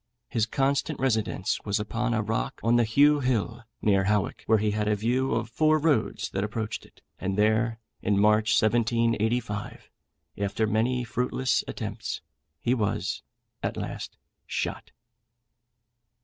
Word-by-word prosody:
His 110 -2 +1
constant 140 +3 0
residence 110 -6 0
was 100 -1 0
upon 115 +3 -1
a 110 - +1
rock 110 +2 -2
on 115 +1 +4
the 120 - +5
Heugh 145 +6 +5
Hill, 120 -3 0 0.2
near 100 -2 +3
Howick, 105 -3 0
where 110 - +5
he 105 0 +1
had 105 0 -1
a 105 - +3
view 125 +5 0
of 115 -1 -1
four 155 +7 +3
roads 155 -2 +1
that 95 - -1
approached 110 +1 -4
it; - - -26 0.2
and 95 +1 -2
there, 110 +2 +2 0.2
in 100 0 +1
March 105 +1 +4
1785, 115 -1 0 0.5
after 100 +2 0
many 115 +4 +1
fruitless 125 +2 0
attempts, - - -4 0.4
he 120 - +1
was 110 -6 -1 0.4
at - - -2
last - - -5 0.3
shot. - - -3
110 Hz, 140 wpm, -27 LUFS, 105-125 Hz, 0.5 s, the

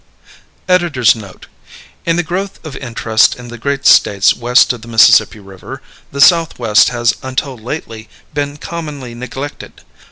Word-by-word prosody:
EDITOR'S 170 -11 +3
NOTE. 100 -5 -12 0.6
In 165 - +2
the 175 - 0
growth 190 +4 -4
of 150 -4 -8
interest 115 -3 +1
in 120 -1 -12
the 120 - -9
great 140 +2 -3
States 100 0 +4
west 125 +1 +3
of 120 - -10
the 115 - -13
Mississippi 115 0 +4
River 95 -2 -11 0.3
the 140 - -7
Southwest 140 -9 +4
has 120 -1 0
until 130 +1 -4
lately 115 -2 -8 0.2
been 145 0 -3
commonly 150 -7 -7
neglected. 130 +4 -8
125 Hz, 140 wpm, -14 LUFS, 115-145 Hz, 0.6 s, States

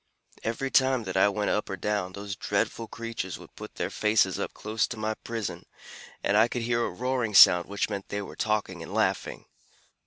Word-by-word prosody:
Every 130 +4 -2
time 130 -2 +3
that 95 -2 -5
I 95 +2 +5
went 105 +1 -1
up 105 - -1
or 95 - -4
down, 100 -3 -2
those 100 0 -6
dreadful 115 +4 -1
creatures 115 -5 -5
would - - -15
put - - -10
their - - -3
faces 105 -3 +2
up - - -3
close 110 +1 -1
to 120 - -7
my 110 0 -1
prison, 115 -1 -5 0.6
and 100 - +2
I 110 +2 +6
could 120 0 -3
hear 120 0 +1
a - - -1
roaring 125 -4 -2
sound 90 -2 +8
which 100 0 -1
meant 100 -2 -5
they 100 0 -3
were - - -9
talking 105 -5 -1
and 80 - -7
laughing. - - -1
105 Hz, 205 wpm, -27 LUFS, 100-115 Hz, 0.6 s, sound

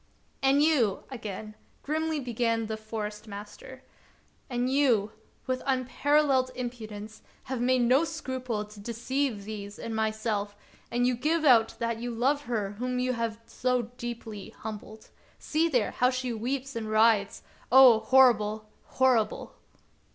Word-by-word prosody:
"And 275 +2 +4
you," 250 -11 +2
again 215 -3 -6 0.3
grimly 315 +1 -1
began 230 -3 -1
the 220 0 -3
Forest 215 -1 -6
master, 210 +6 -10 0.7
"and 245 0 -1
you, 255 -7 +2 0.3
with 255 0 -2
unparalleled 265 +1 +2
impudence, 220 -4 -7 0.2
have 260 -2 -4
made 255 0 +3
no 255 +6 +4
scruple 260 -9 -4
to 210 0 -14
deceive 235 +1 -2
these 205 -1 -7
and 225 - -5
my 220 0 +1
self, 215 -2 -3 0.3
and 245 +1 +1
you 250 - +3
give 310 +6 0
out 230 -5 +5
that 230 -1 -2
you 240 +1 -4
love 270 +5 0
her 215 -5 -2
whom 250 0 -2
you 255 0 0
have 230 -2 -3
so 250 -2 -1
deeply 225 -4 -6
humbled. 215 0 -9 0.3
See 320 +2 0
there, 245 -8 +1
how 250 - +2
she 255 -1 -2
weeps 260 +4 -3
and 220 -2 -4
writhes! 215 -2 +3 0.3
Oh, 255 -3 +8
horrible! 220 -4 +3
horrible 255 -4 +1
240 Hz, 140 wpm, -28 LUFS, 215-260 Hz, 0.7 s, Oh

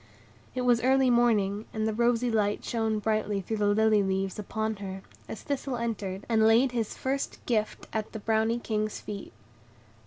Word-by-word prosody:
It 255 - -1
was 245 -1 +3
early 265 0 +4
morning, 215 -4 +2
and 220 0 0
the 220 - 0
rosy 235 +1 +2
light 210 -2 0
shone 225 -2 0
brightly 210 -1 0
through 220 +3 -3
the 205 -1 +1
lily 215 0 +4
leaves 190 0 -1
upon 220 +1 -2
her, 195 -1 -7 0.3
as - - -7
Thistle 275 -2 -2
entered, 210 -5 -3
and 220 -1 +4
laid 235 +4 +5
his 230 -3 -2
first 270 +1 -2
gift 220 -3 -1
at 215 -1 -2
the - - -5
Brownie 220 +2 +1
King's 215 -2 -2
feet. 205 -2 -7
220 Hz, 175 wpm, -28 LUFS, 210-235 Hz, 0.3 s, laid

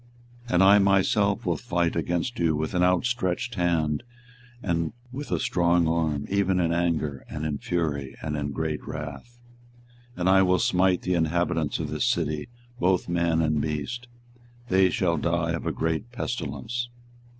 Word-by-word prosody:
24:021:005 120 - -5
And 90 - +6
I 100 +2 +7
myself 100 +2 +2
will - - +1
fight 85 -8 -1
against 85 +9 -1
you 80 -2 +2
with 75 +1 -2
an 90 - +1
outstretched 95 +3 +1
hand 85 -6 +1 0.6
and 85 -1 -1 0.2
with 140 +3 -6
a - - +1
strong 85 -8 +2
arm, 80 -3 0
even 95 -2 +1
in 85 -1 +1
anger, 80 -5 -1
and 75 - -4
in 75 -2 -2
fury, 75 -6 -2
and 75 -1 -3
in 75 -1 -2
great 75 +1 -2
wrath. 75 - -7 0.8
24:021:006 - - -15
And 90 - +2
I 95 0 +6
will 90 -1 +4
smite 90 +1 +2
the 90 - 0
inhabitants 85 -2 0
of 75 -2 -4
this 75 - 0
city, 75 +4 -1 0.3
both 90 +1 +2
man 85 -1 +1
and 75 -1 +1
beast: 80 +12 -3 0.6
they 95 0 +4
shall 85 -2 +1
die 85 +2 0
of 85 - -3
a - - +1
great 80 +8 -2
pestilence. 120 0 -4
85 Hz, 165 wpm, -26 LUFS, 80-95 Hz, 0.8 s, I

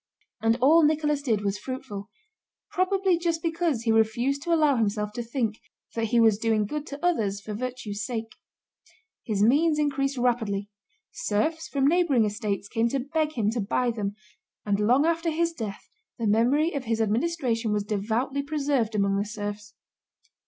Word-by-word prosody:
And 225 +1 +3
all 310 +6 +6
Nicholas 300 -1 +2
did 225 -7 0
was 200 0 -1
fruitful—probably 360 - -3
just 335 -1 -1
because 325 -7 0
he 225 - +2
refused 235 +5 +2
to 340 - -3
allow 305 -4 +4
himself 210 -1 0
to 240 - -3
think 230 -2 -2 0.3
that 230 -1 -1
he 235 +2 +2
was 220 -3 +4
doing 220 -2 +1
good 300 +7 -4
to 290 +4 -5
others 210 - +1
for 210 +1 -7
virtue's 225 -3 -4
sake. 225 -3 -4 0.9
His 205 -3 +1
means 300 +7 +4
increased 275 -2 0
rapidly; 220 -5 0 0.4
serfs 320 +11 -1
from 275 -1 0
neighboring 300 -8 +3
estates 205 -1 -2
came 230 +2 0
to 275 - -1
beg 305 +3 -1
him 220 -5 0
to 230 0 -2
buy 240 +4 0
them, 205 -3 -3 0.5
and 205 -1 +1
long 245 +8 +4
after 335 0 +1
his 335 +1 0
death 220 -9 -6 0.3
the 230 - -2
memory 250 - +3
of 280 -3 -3
his 225 0 0
administration 230 0 0
was 210 -1 0
devoutly 220 +7 -1
preserved 280 -6 -1
among 200 -1 +2
the 200 - 0
serfs. 205 -1 -6
240 Hz, 165 wpm, -26 LUFS, 210-295 Hz, 0.9 s, all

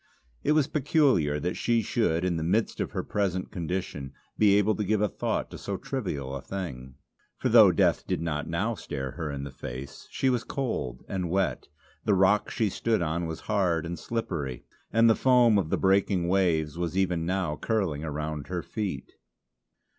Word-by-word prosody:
It - - +3
was 155 -2 +4
peculiar 135 - +2
that 90 +4 -1
she 115 -1 +1
should 90 -7 +1
in 90 -2 +1
the - - -2
midst 105 +7 0
of - - -1
her - - -3
present 95 -3 -1
condition 85 -7 -4 0.2
be 105 -2 +5
able 105 +1 +3
to 105 - 0
give 105 +1 +1
a 105 - +3
thought - - -2
to - - -8
so - - -3
trivial 70 -1 -4
a 70 - -5
thing. 65 -8 -6 0.4
For - - 0
though - - +8
death - - +2
did - - 0
not 75 -3 -3
now - - 0
stare 65 -1 -5
her 80 0 -4
in 70 -1 -4
the 70 - -6
face, 65 +3 -8
she 135 - -1
was 120 -2 0
cold 90 - -3
and 90 -3 -2
wet; 95 +2 0 0.4
the 105 - +3
rock 95 +2 +3
she 110 - 0
stood 110 0 0
on 85 +1 -1
was 80 -1 -6
hard 90 -6 +1
and 85 +1 -5
slippery, 75 - -3 0.3
and 115 +1 +5
the 115 - +7
foam 120 -4 +4
of 85 -5 -2
the - - +1
breaking 95 -2 +2
waves 85 -4 +1
was 85 +1 -2
even 90 -3 +1
now 90 -5 0
curling 95 -8 -1
around 75 -1 -4
her 90 -1 -3
feet. 105 -4 -4
90 Hz, 190 wpm, -27 LUFS, 75-105 Hz, 0.4 s, though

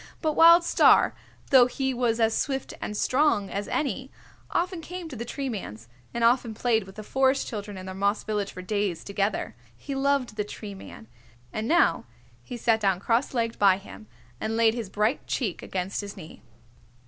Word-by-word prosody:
But 310 -2 0
Wild 335 +1 +8
Star, - - +5 0.4
though 255 -3 +7
he 265 +1 -2
was 240 -2 0
as 225 -1 +2
swift 270 -2 -2
and 210 - -4
strong 255 -9 +2
as 200 +1 -3
any, 265 -2 -2 0.4
often 355 0 -1
came 355 +1 -7
to 270 - -8
the 235 - -4
Tree 275 +3 -4
Man's, 115 - -6 0.2
and 235 - -2
often 235 -1 +3
played 225 -3 +1
with 190 0 -13
the 215 - -7
Forest 265 +4 +1
Children 205 -2 -6
in 185 - -8
their 190 - -6
moss 200 +2 0
village 205 -2 -2
for 185 - -9
days 200 -4 -2
together. 200 0 -2 0.2
He 280 - -6
loved 270 -4 0
the 210 - 0
Tree 210 0 -8
Man, 190 - -11 0.5
and 215 +1 -3
now 345 +5 +3 0.4
he 245 - -8
sat 225 -1 +2
down 195 -4 +1
cross 235 +6 0
legged 230 -1 -1
by 195 -2 +5
him, 205 +2 -12 0.3
and 220 +1 -2
laid 225 -1 +4
his 230 -5 -5
bright 215 +7 0
cheeck 215 -10 -2
against 190 +2 -3
his 200 0 -8
knee. 165 -3 -11
225 Hz, 190 wpm, -26 LUFS, 200-265 Hz, 0.5 s, Wild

